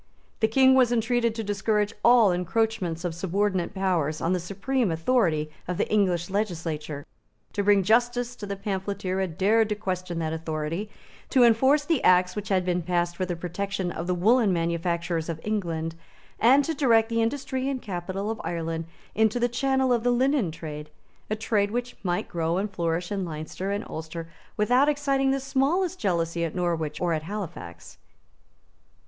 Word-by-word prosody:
The 220 - +3
King 260 +4 +5
was 255 -2 +4
entreated 235 0 +1
to 225 - -3
discourage 210 +1 0
all 235 -4 +6
encroachments 180 -1 -1
of 175 - -1
subordinate 190 +2 -1
powers 170 -6 0
on 170 - 0
the 180 - +1
supreme 205 +7 -1
authority 165 -4 +1 0.2
of 180 0 -2
the - - 0
English 180 -5 +2
legislature, 160 -7 -3 0.5
to 205 - -1
bring 200 -1 +4
to - - -8
justice 240 +2 +2
the 205 -3 -5
pamphleteer 195 -1 -3
who - - 0
had 175 -4 -3
dared 220 +3 +3
to 210 - 0
question 185 -4 -4
that 160 -1 -2
authority, 160 +4 -3 0.4
to 260 -3 +5
enforce 265 +6 +4
the 320 -4 +1
Acts 180 0 +4
which 210 -1 -5
had 185 -2 +2
been 180 -1 0
passed 175 0 -1
for 185 +1 -2
the 175 - -2
protection 180 +2 -3
of 170 +1 -5
the 180 - +1
woollen 215 +4 +4
manufactures 170 -1 -1
of 165 -1 -3
England, 170 -6 -2 0.5
and 270 +5 +5
to 325 - -1
direct 230 -6 +3
the 230 0 +1
industry 265 +2 -1
and 270 -2 -2
capital 190 +2 -3
of 225 - -5
Ireland 165 -1 -3 0.3
into 220 +2 +2
the 240 - +3
channel 265 +1 +1
of 235 - +1
the 245 - +1
linen 255 - +2
trade, 150 -2 -7 0.4
a 215 - 0
trade 215 -2 0
which 245 +3 -3
might 175 -2 -1
grow 165 0 -1
and 200 +2 -2
flourish 175 0 -2
in 200 -2 -1
Leinster 160 +3 -5
and 200 +2 -2
Ulster 160 +1 -6 0.3
without 250 +7 +4
exciting 275 -2 +1
the 270 0 +1
smallest 315 +8 0
jealousy 170 -3 0
at 165 0 -3
Norwich 165 -4 -1
or 175 -2 +1
at 155 - -1
Halifax. 155 - -7
195 Hz, 175 wpm, -26 LUFS, 170-230 Hz, 0.5 s, all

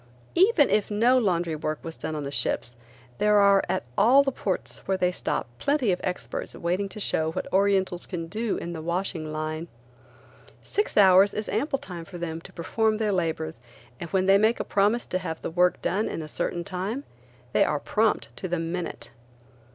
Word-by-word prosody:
Even 365 -5 +5
if 210 - +2
no 235 +5 +4
laundry 175 -7 0
work 155 0 -2
was 165 -1 -6
done 155 0 -5
on 150 - -3
the 140 - -4
ships, 120 -3 -1 0.4
there 210 0 +4
are 200 -1 +5
at - - 0
all 245 +7 +6
of - - -2
the 270 - +1
ports 195 -6 -3
where 190 - +1
they 180 -1 +2
stop - - -2
plenty 280 - +2
of 180 - -1
experts 180 -1 -4
waiting 185 +4 -1
to 210 - -8
show 160 -5 0
what - - -3
Orientals 190 -2 +2
can 170 -3 -4
do 215 +5 -2
in 170 - -5
the 160 - -6
washing 170 -2 -2
line. 155 +2 -4 1.0
Six 415 - -1
hours 195 0 +6
is 215 0 -3
ample 275 +6 0
time 180 -11 -8
for 185 -1 -9
them 165 -1 -4
to - - -13
perform 215 +6 0
their 215 -2 0
labors 160 -4 -2 0.4
and 170 - -6
when 185 +2 +1
they 195 +1 +6
make 220 +3 +3
a - - 0
promise 210 +4 +1
to 185 - -2
have 160 -3 -5
work 180 0 +3
done 210 +4 0
in 165 - -4
a - - -7
certain 175 +3 -2
time, 195 +9 -4 0.5
they - - +5
are 150 - 0
prompt 220 +6 0
to 185 - -4
the 175 0 -1
minute. 165 -8 -4
185 Hz, 200 wpm, -26 LUFS, 165-210 Hz, 1.0 s, all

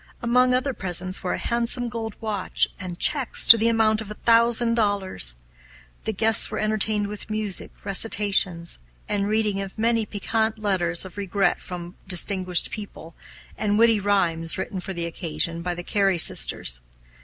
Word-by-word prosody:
Among 250 +2 +2
other 255 +2 0
presents 185 -2 -3
were 180 - -3
a - - -3
handsome 235 +1 -1
gold 225 -3 -6
watch 210 -4 -1
and 180 -3 -7
checks 275 +3 +3
to - - +10
the 230 0 0
amount 220 -1 +1
of 215 - -9
a 210 - -7
thousand 230 +1 +3
dollars. 200 - +1 0.7
The - - -1
guests 220 +1 +5
were 215 - -5
entertained 215 -1 0
with 210 +2 -7
music, 215 -3 -2 0.2
recitations, 195 -4 +1 0.3
the 205 - -2
reading 210 -1 -1
of 195 +1 -9
many 225 -1 0
piquant 220 +2 -2
letters 185 -5 +1
of 190 - -12
regret 195 -2 -1
from 175 0 -9
distinguished 185 -1 +1
people, 200 -6 -9 0.5
and 205 -1 0
witty 230 -1 +4
rhymes 175 -5 -1
written 190 0 -5
for 185 - -7
the 170 -1 -4
occasion 170 0 -4
by 175 0 -4
the 175 - -8
Cary 195 -1 0
sisters. 60 - +3
205 Hz, 160 wpm, -23 LUFS, 180-220 Hz, 0.7 s, to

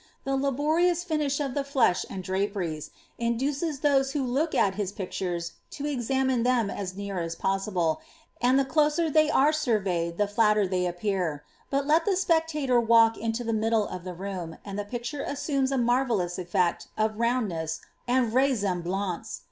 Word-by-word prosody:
The 270 0 -1
laborious 310 +6 +1
finish 300 -5 0
of 275 -3 -2
the 285 - -1
flesh 260 -10 +2
and 190 -1 -6
dnperies, 190 -5 -2 0.3
indoeei 270 +6 -1
those 270 -2 +2
who 285 -3 0
look 280 +6 0
at 195 - +3
his 200 -1 -3
pictures 180 -3 -4 0.2
to 285 - -6
examine 265 -2 0
them 240 -4 +2
as 185 -1 -5
near 200 -2 -4
as 165 -1 -3
possible, 185 -4 0 0.4
and 250 +2 +4
the 275 - +3
closer 305 +3 +2
they 310 +1 +4
are 300 0 +4
surveyed 190 - 0
the 205 - +2
flatter 210 0 +3
they 180 -1 0
appear; 175 -4 -2 0.3
but 275 0 0
let 315 +3 +3
the 400 - +2
spectator 320 -8 +2
walk 230 0 +5
into 225 +2 -2
the 230 -1 -1
middle 220 -1 +1
of 180 - -7
the 180 -1 -6
room, 180 -3 -5
and 200 0 -5
the 205 - -3
picture 240 +5 -4
assumes 275 -2 -1
a 270 - +1
marrelloQS 235 -8 +1
effect 175 -1 0
of 215 0 0
roundness, 205 -10 -1 0.3
and 245 -2 +2
vraisemblance. 195 - 0
230 Hz, 165 wpm, -27 LUFS, 190-275 Hz, 0.4 s, walk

